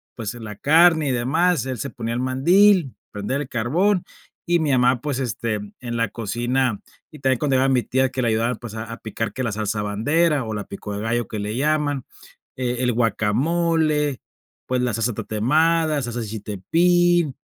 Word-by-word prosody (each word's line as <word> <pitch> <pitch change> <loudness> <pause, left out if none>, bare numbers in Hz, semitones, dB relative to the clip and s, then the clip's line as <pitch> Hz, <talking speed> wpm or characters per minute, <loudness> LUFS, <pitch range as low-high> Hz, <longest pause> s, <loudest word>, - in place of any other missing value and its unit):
pues 115 -1 -4
en 115 -2 -9
la 105 -1 -7
carne 160 +1 +4
y - - +1
demás, 140 +5 +1
él 130 -2 -3
se 140 - -4
ponía 115 -1 -4
el 125 - -2
mandil, 170 +5 +4 0.2
prender 105 +8 -3
el 135 - -6
carbón 175 - +1 0.4
y 175 0 +3
mi 150 -3 0
amá, 125 -1 +3
pues, 145 -3 -2
este, 115 -3 -2 0.3
en 120 -1 -4
la 115 -1 +1
cocina 120 +1 -1 0.3
y 150 - -12
también 130 -2 +1
cuando 140 -3 +1
iba 135 +1 +3
mi 130 -3 +2
tía 130 +1 +1
que 130 - -2
le 120 - +1
ayudaba, 115 +2 +1
pues, 115 -1 -9
a 110 - -4
a 115 - -6
picar 110 +1 -4
que 130 - -3
la 115 - -1
salsa 105 0 -2
bandera 140 +7 +1
o 110 - -4
la 105 -1 -3
pico 100 +1 -7
de 100 - -4
gallo 120 +1 -1
que 110 - -5
le 105 +3 -3
llaman, 145 -2 0 0.5
eh 125 -1 -2
el 125 -1 +1
guacamole, 150 +6 +1 0.5
pues, 125 -1 0
la 120 -3 0
salsa 115 +1 0
tatemada, 150 +8 +1
salsa 120 0 -4
de 110 - -4
chiltepín, 165 - +1
125 Hz, 195 wpm, -22 LUFS, 115-150 Hz, 0.5 s, carne